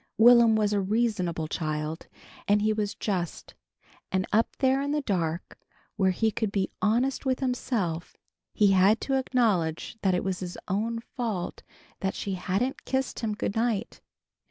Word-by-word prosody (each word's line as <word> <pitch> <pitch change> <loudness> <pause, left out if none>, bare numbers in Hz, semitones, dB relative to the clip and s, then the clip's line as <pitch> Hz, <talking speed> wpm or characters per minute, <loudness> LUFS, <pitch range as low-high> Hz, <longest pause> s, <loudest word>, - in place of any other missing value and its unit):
Will'm 235 -1 +7
was 210 -1 +2
a 200 - +2
reasonable 190 -6 0
child, 155 0 -3 0.4
and 205 +1 +3
he 215 0 +3
was 210 -1 -2
just, 180 -5 -3 0.6
and 190 0 +1
up 225 +2 +2
there 265 0 +2
in 285 +1 -1
the 300 - +1
dark 170 -6 -2 0.4
where 190 -2 +3
he 220 +4 +1
could 215 0 -2
be 195 -2 -1
honest 240 +5 +1
with 260 -2 0
himself, 225 -10 -2 0.3
he 205 -3 +4
had 195 +4 +5
to 270 - -2
acknowledge 220 -7 0
that 190 -2 +2
it 180 - -1
was 190 -1 -2
his 180 -1 -6
own 220 +5 -1
fault 225 -7 -4 0.4
that 190 0 -2
she 200 - -3
hadn't 195 +8 -1
kissed 265 0 -2
him 215 -2 -2
good 205 - -3
night. 225 -1 -1
210 Hz, 160 wpm, -27 LUFS, 185-235 Hz, 0.6 s, Will'm